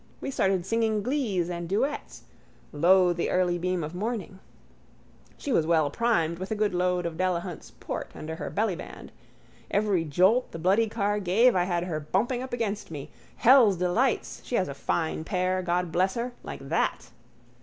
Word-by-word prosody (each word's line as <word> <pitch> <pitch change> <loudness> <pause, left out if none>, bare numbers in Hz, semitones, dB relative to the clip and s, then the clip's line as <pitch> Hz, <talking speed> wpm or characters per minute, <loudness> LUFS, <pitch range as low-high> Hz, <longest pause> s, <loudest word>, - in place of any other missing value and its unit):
We - - -4
started 190 -7 +1
singing 220 0 0
glees 225 - 0
and 170 -1 -5
duets: 270 +10 -2 0.5
Lo, 180 +4 +4
the 170 - -2
early 180 -1 +1
beam 180 -1 -1
of 155 +2 -5
morning. 200 0 -4 1.0
She 285 - -4
was 160 -9 +2
well 160 -4 +3
primed 170 -6 +1
with 185 - -5
a 220 - -1
good 210 -2 0
load 180 0 0
of 165 -1 -4
Delahunt's 180 -2 -2
port - - -6
under 160 +1 -6
her 150 - -4
bellyband. 205 -5 -3 0.6
Every 200 -4 +1
jolt 185 - +2
the - - -5
bloody 195 +7 +2
car 205 -1 0
gave 210 +6 +4
I 180 -1 +2
had 175 -2 -1
her 170 -4 -3
bumping 210 - -1
up 260 - -6
against 215 -4 -3
me. 145 -4 -7 0.2
Hell's 235 -6 +6
delights! 180 +9 0
She 245 - -3
has 185 - +1
a 140 - -5
fine 160 +3 -2
pair, 185 +1 0
God 175 -1 -1
bless 185 +3 +1
her. 240 +1 -2
Like - - -8
that. - - -1
185 Hz, 175 wpm, -27 LUFS, 170-220 Hz, 1.0 s, Hell's